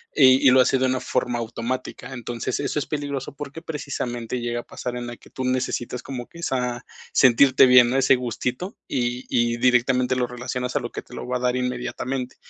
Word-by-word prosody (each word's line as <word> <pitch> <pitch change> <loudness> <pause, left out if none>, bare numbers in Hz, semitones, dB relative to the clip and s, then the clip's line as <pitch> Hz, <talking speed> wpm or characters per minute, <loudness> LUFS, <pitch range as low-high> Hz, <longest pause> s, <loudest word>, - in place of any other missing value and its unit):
y 130 -2 +6
y - - +8
lo 130 0 +7
hace 130 - +3
de 130 - +1
una 130 0 +1
forma 120 -1 -1
automática. 120 +3 -5
Entonces, 120 -1 -4
eso 140 0 -2
es 150 - 0
peligroso 145 -3 -4
porque 145 +3 -8
precisamente 125 -6 -4
llega 120 0 -2
a - - -21
pasar 125 -1 -6
en 120 0 -5
la 120 0 -7
que - - -19
tú 130 - -4
necesitas 125 -1 -2
como 125 -3 -6
que 170 - -13
esa 125 -4 -2 0.3
sentirte 130 +1 +6
bien, 125 -1 +7
ese 135 0 +5
gustito, 125 - -4
y 125 0 -2
y 120 0 +1
directamente 125 +1 +3
lo 125 -1 0
relacionas 125 +1 -4
a - - +3
lo - - -6
que - - -5
te - - -13
lo - - -6
va 125 0 0
a - - -6
dar 125 0 +1
inmediatamente. 125 +1 -3
125 Hz, 205 wpm, -23 LUFS, 120-130 Hz, 0.3 s, y